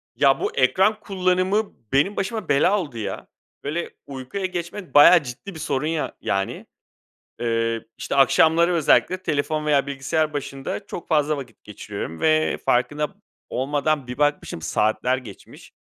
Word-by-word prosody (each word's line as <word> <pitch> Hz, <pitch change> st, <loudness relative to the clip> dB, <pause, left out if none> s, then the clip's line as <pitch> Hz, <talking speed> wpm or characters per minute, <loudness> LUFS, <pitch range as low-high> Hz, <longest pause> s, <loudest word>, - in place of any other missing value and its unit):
Ya, 135 Hz, -2 st, +4 dB
bu -, -, -1 dB
ekran 190 Hz, +11 st, +3 dB
kullanımı 190 Hz, +2 st, 0 dB, 0.2 s
benim 150 Hz, +10 st, +3 dB
başıma 215 Hz, -1 st, -3 dB
bela 180 Hz, +9 st, +3 dB
oldu, 145 Hz, -10 st, -6 dB
ya. 105 Hz, -3 st, -5 dB, 0.4 s
Böyle, 155 Hz, +4 st, -3 dB, 0.2 s
uykuya 140 Hz, +8 st, -5 dB
geçmek 175 Hz, +1 st, -5 dB
bayağı 165 Hz, +3 st, +8 dB
ciddi 130 Hz, +10 st, -8 dB
bir -, -, -8 dB
sorun 145 Hz, 0 st, -1 dB
ya 160 Hz, -1 st, -2 dB
yani. 95 Hz, 0 st, -2 dB, 0.7 s
Iıı, 115 Hz, -1 st, -1 dB
işte, -, -, -3 dB
akşamları 160 Hz, +5 st, +4 dB
özellikle 175 Hz, +3 st, +3 dB
telefon 150 Hz, +1 st, -1 dB
veya 145 Hz, -2 st, +2 dB
bilgisayar 150 Hz, +3 st, -1 dB
başında 140 Hz, +6 st, -5 dB
çok 175 Hz, -, -7 dB
fazla 155 Hz, -2 st, +2 dB
vakit 125 Hz, -5 st, -10 dB
geçiriyorum 100 Hz, -5 st, -7 dB
ve 155 Hz, 0 st, +2 dB
farkında 145 Hz, +5 st, +1 dB
p -, -, -23 dB, 0.4 s
olmadan 145 Hz, +1 st, -1 dB
bir 125 Hz, -, -6 dB
bakmışım 145 Hz, -, 0 dB
saatler 110 Hz, +9 st, +1 dB
geçmiş. 115 Hz, -7 st, -12 dB
150 Hz, 145 wpm, -23 LUFS, 130-170 Hz, 0.7 s, bayağı